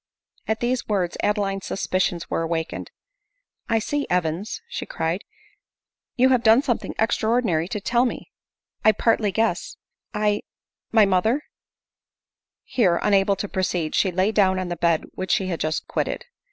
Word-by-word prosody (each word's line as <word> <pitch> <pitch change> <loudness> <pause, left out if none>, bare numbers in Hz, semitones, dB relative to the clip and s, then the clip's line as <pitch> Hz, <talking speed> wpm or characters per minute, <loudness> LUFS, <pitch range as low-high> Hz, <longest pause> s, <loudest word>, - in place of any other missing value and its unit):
At 220 +2 -1
these 245 +1 0
words 190 -5 0
Adeline's 200 -2 0
suspicions 185 -3 -1
were - - -1
awakened. 165 0 -3 0.4
" - - -53 0.3
I 225 - +3
see, 285 +6 -1
Evans," 180 +3 -1
she 475 - -5
cried, 165 +4 -2 0.5
" - - -68
you 260 +1 +5
have 255 -2 +3 0.2
something 240 -5 -2
extra 220 0 +1
ordinary 190 -9 +1
to 210 - -3
tell 240 +4 +2
me; 245 - -4 0.5
I 215 - +6
partly 220 -1 +2
guess; 225 +3 -1 0.3
I 210 -1 +1 0.3
— - - -62
my 220 -2 +6
mother 215 +9 +2 0.6
* - - -69
Here, 185 -9 +4
unable 200 -1 +3
to 195 +2 -4
proceed, 180 -5 -1
she 190 - +2
lay 185 +4 +2
down 190 -3 +3
on 185 -1 -2
the 175 - -2
bed 170 -1 +2
which 185 - -5
she 190 -1 +1
had 170 - -2
just 155 0 -1
quitted. - - -2
195 Hz, 165 wpm, -23 LUFS, 180-225 Hz, 0.6 s, I